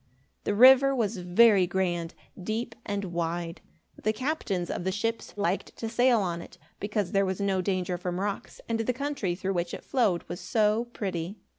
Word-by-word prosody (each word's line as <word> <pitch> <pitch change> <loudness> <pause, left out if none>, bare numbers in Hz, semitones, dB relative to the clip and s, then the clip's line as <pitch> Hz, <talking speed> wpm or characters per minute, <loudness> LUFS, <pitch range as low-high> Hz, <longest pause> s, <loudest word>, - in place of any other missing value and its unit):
The 205 - 0
river 265 +4 +7
was 220 -4 0
very 185 +2 +5
grand, 175 -2 -1 0.3
deep, 225 +5 -3
and 200 -1 -2
wide. 170 0 -3 0.4
The 215 - +2
captains 215 - -2
of - - -3
the 190 - 0
ships 225 +3 -2
liked 200 -2 -1
to 225 - -4
sail 240 0 +3
on 170 -3 -2
it, - - -13 0.2
because 205 -2 -2
there 195 - +3
was 190 0 -2
no 195 -2 +1
danger 180 -2 -1
from 180 0 -3
rocks, 200 0 -4
and 230 -1 -1
the 225 +3 0
country 265 -9 -2
through 195 +1 -2
which 175 -1 -2
it - - -10
flowed 215 -10 +1
was 175 - -6
so 215 +1 +1
pretty. 195 -5 -4
200 Hz, 180 wpm, -28 LUFS, 180-230 Hz, 0.4 s, river